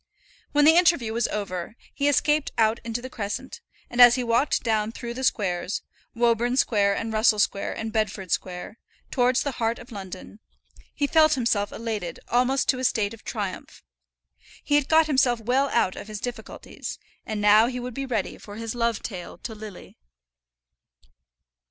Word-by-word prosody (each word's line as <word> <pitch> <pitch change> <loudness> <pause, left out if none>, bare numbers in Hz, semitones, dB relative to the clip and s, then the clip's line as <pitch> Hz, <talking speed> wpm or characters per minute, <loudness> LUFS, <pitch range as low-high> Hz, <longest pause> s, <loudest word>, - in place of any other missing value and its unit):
When 295 0 +4
the 320 +2 +7
interview 335 -11 +3
was 235 0 +1
over, 195 -1 -4 0.2
he 285 - 0
escaped 295 +1 +2
out 225 0 +3
into 235 +1 -4
the 255 - -6
crescent, 205 -3 -5 0.3
and 245 - +1
as 240 -1 +9
he 255 - -1
walked 235 +4 +1
down 220 -2 0
through 235 +1 -6
the 260 +2 -6
squares, 185 -5 -1 0.3
Woburn 240 +1 +2
Square, 200 -5 +3
and 225 +1 -3
Russell 215 0 +4
Square, 200 -1 0
and 220 0 -5
Bedford 210 -5 -2
Square, 180 +6 -3 0.3
towards 250 0 +2
the 280 - -2
heart 230 -2 -1
of 245 - -13
London, 195 0 -9 0.6
he 290 - +1
felt 310 +1 +4
himself 225 -5 0
elated 215 -6 -4
almost 255 +3 +2
to 255 - +2
a - - -4
state 220 -4 +1
of 225 - -13
triumph. 200 -4 -6 0.8
He - - -2
had 290 -1 +3
got 320 0 +5
himself 265 -5 +2
well 255 +5 +1
out 190 -7 +1
of - - -8
his 215 -1 -6
difficulties, 245 +2 -7 0.3
and 215 -1 -4
now 210 +2 +6
he 250 0 -4
would 250 0 -6
be 275 +2 -4
ready 225 -6 -2
for 205 - -11
his 225 0 -5
love 235 -2 -1
tale 180 -6 -7
to 225 - -7
Lily. 215 -3 -11
230 Hz, 175 wpm, -25 LUFS, 210-255 Hz, 0.8 s, as